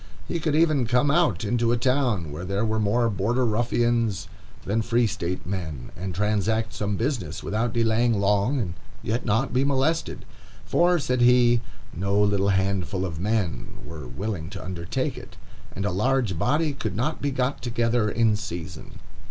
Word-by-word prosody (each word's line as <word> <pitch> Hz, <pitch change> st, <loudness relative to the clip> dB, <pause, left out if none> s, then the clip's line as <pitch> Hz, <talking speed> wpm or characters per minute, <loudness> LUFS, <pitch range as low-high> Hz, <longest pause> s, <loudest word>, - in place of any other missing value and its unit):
He 170 Hz, -, -2 dB
could 155 Hz, -2 st, 0 dB
even 155 Hz, -6 st, +3 dB
come 125 Hz, +4 st, +3 dB
out 130 Hz, -, +2 dB
into 115 Hz, +2 st, +1 dB
a 120 Hz, -, +2 dB
town 120 Hz, -, +1 dB
where 80 Hz, +4 st, -6 dB
there 100 Hz, +4 st, -1 dB
were 110 Hz, 0 st, 0 dB
more 110 Hz, +3 st, +2 dB
Border 115 Hz, +5 st, 0 dB
Ruffians 115 Hz, -2 st, +1 dB, 0.4 s
than 110 Hz, +3 st, +1 dB
Free 115 Hz, +1 st, +2 dB
State 90 Hz, -4 st, -3 dB
men, 80 Hz, -9 st, -5 dB
and 90 Hz, 0 st, -5 dB
transact 110 Hz, +3 st, 0 dB
some 105 Hz, -1 st, -2 dB
business, 115 Hz, -, -2 dB
without 115 Hz, +3 st, -1 dB
delaying 115 Hz, -1 st, +2 dB
long, 100 Hz, +6 st, +2 dB
and 90 Hz, -8 st, -2 dB, 0.3 s
yet 115 Hz, +3 st, -1 dB
not 115 Hz, +6 st, +1 dB
be 130 Hz, +2 st, +3 dB
molested; 145 Hz, +4 st, 0 dB, 0.4 s
for 175 Hz, +1 st, +3 dB
said 125 Hz, -5 st, 0 dB
he, 120 Hz, -1 st, +5 dB, 0.3 s
"No 100 Hz, +3 st, 0 dB
little 100 Hz, -1 st, +2 dB
handful 95 Hz, -1 st, 0 dB
of 80 Hz, -4 st, -5 dB
men 100 Hz, -2 st, -1 dB
were 75 Hz, -4 st, -8 dB
willing 80 Hz, -, -4 dB
to 95 Hz, -2 st, -8 dB
undertake 85 Hz, -2 st, -3 dB
it, -, -, -14 dB, 0.4 s
and 100 Hz, -, -2 dB
a 100 Hz, -, +1 dB
large 115 Hz, +1 st, +1 dB
body 150 Hz, -, +1 dB
could 110 Hz, -7 st, -4 dB
not 140 Hz, +8 st, -1 dB
be 145 Hz, -, 0 dB
got 130 Hz, +1 st, -1 dB
together 115 Hz, -2 st, +1 dB
in 110 Hz, 0 st, +2 dB
season." 90 Hz, -6 st, -7 dB
110 Hz, 170 wpm, -25 LUFS, 100-125 Hz, 0.4 s, he